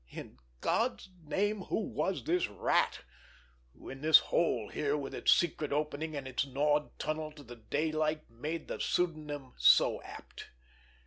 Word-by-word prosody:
In 65 Hz, -, -10 dB, 0.2 s
God's 100 Hz, -, 0 dB
name, 205 Hz, +6 st, 0 dB
who -, -, -1 dB
was 195 Hz, -2 st, -2 dB
this 175 Hz, +2 st, +1 dB
Rat, 100 Hz, -2 st, +1 dB, 0.8 s
who -, -, -13 dB
in 135 Hz, +1 st, -8 dB
this 155 Hz, +1 st, +8 dB
hole 120 Hz, -11 st, 0 dB
here 145 Hz, 0 st, -1 dB
with 140 Hz, -2 st, -5 dB
its -, -, +2 dB
secret 155 Hz, -3 st, +2 dB
opening 150 Hz, +1 st, -2 dB
and 140 Hz, -2 st, -5 dB
its 130 Hz, 0 st, 0 dB
gnawed 145 Hz, +2 st, 0 dB
tunnel 155 Hz, 0 st, -3 dB
to 150 Hz, -1 st, -13 dB
the 120 Hz, -2 st, -11 dB
daylight 155 Hz, +6 st, -1 dB
made 150 Hz, +8 st, -5 dB
the -, -, -5 dB
pseudonym 150 Hz, -6 st, -2 dB
so -, -, +5 dB
apt! -, -, -11 dB
150 Hz, 150 wpm, -32 LUFS, 135-160 Hz, 0.8 s, this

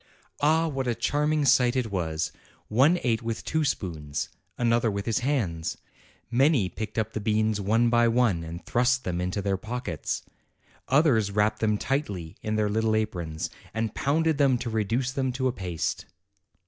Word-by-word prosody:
Ah, 160 Hz, +3 st, +3 dB
what 135 Hz, -4 st, -2 dB
a 120 Hz, -, +1 dB
charming 150 Hz, +3 st, +1 dB
sight 125 Hz, -1 st, +4 dB
it 125 Hz, -4 st, -1 dB
was! 80 Hz, -4 st, -1 dB, 0.4 s
One 135 Hz, +11 st, +4 dB
ate 115 Hz, -3 st, +1 dB
with 115 Hz, -1 st, -4 dB
two 160 Hz, -1 st, 0 dB
spoons, 80 Hz, -, -2 dB, 0.3 s
another 115 Hz, -1 st, +2 dB
with 100 Hz, -1 st, -3 dB
his 115 Hz, 0 st, +1 dB
hands; 105 Hz, -, -1 dB, 0.5 s
many 130 Hz, -, +3 dB
picked 110 Hz, +2 st, -6 dB
up 110 Hz, -, -1 dB
the -, -, -2 dB
beans 110 Hz, 0 st, +1 dB
one 115 Hz, +4 st, +2 dB
by 120 Hz, 0 st, +4 dB
one, 115 Hz, -8 st, +2 dB
and 85 Hz, +2 st, -8 dB
thrust 125 Hz, +2 st, +2 dB
them 90 Hz, -1 st, -2 dB
into 90 Hz, +2 st, -2 dB
their 100 Hz, -1 st, 0 dB
pockets; 110 Hz, -6 st, -4 dB, 0.6 s
others 130 Hz, -7 st, +3 dB
wrapped 105 Hz, +2 st, +1 dB
them 105 Hz, -1 st, +2 dB
tightly 100 Hz, -, -2 dB
in 110 Hz, -1 st, -2 dB
their 105 Hz, -1 st, +2 dB
little 110 Hz, +1 st, +1 dB
aprons, 85 Hz, -8 st, -2 dB, 0.2 s
and 110 Hz, -1 st, -1 dB
pounded 155 Hz, +2 st, +1 dB
them 135 Hz, -3 st, +4 dB
to 120 Hz, -1 st, -4 dB
reduce 115 Hz, +4 st, 0 dB
them 130 Hz, -2 st, -1 dB
to 130 Hz, +1 st, 0 dB
a -, -, +1 dB
paste. 90 Hz, -8 st, -3 dB
115 Hz, 170 wpm, -27 LUFS, 100-130 Hz, 0.6 s, sight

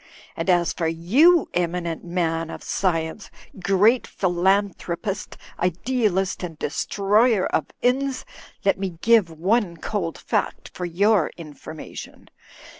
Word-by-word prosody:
And -, -, -3 dB
as 175 Hz, -2 st, +3 dB
for 165 Hz, -, -1 dB
you, 250 Hz, -, +4 dB
eminent 170 Hz, -1 st, -2 dB
man 165 Hz, -2 st, -1 dB
of -, -, -8 dB
science, 165 Hz, +1 st, -1 dB, 0.3 s
great 205 Hz, +6 st, +3 dB
philanthropist, 190 Hz, +1 st, -1 dB, 0.2 s
idealist 195 Hz, +1 st, 0 dB
and 170 Hz, -4 st, -6 dB
destroyer 205 Hz, -, +2 dB
of -, -, 0 dB, 0.2 s
inns, 265 Hz, +2 st, +1 dB, 0.4 s
let 195 Hz, -, +3 dB
me 185 Hz, -4 st, -4 dB
give 225 Hz, -6 st, +5 dB
one 175 Hz, +3 st, 0 dB
cold 170 Hz, -1 st, -3 dB
fact -, -, -2 dB
for 180 Hz, -, -4 dB
your 195 Hz, +1 st, +2 dB
information. 155 Hz, -1 st, -10 dB
185 Hz, 115 wpm, -23 LUFS, 170-210 Hz, 0.4 s, give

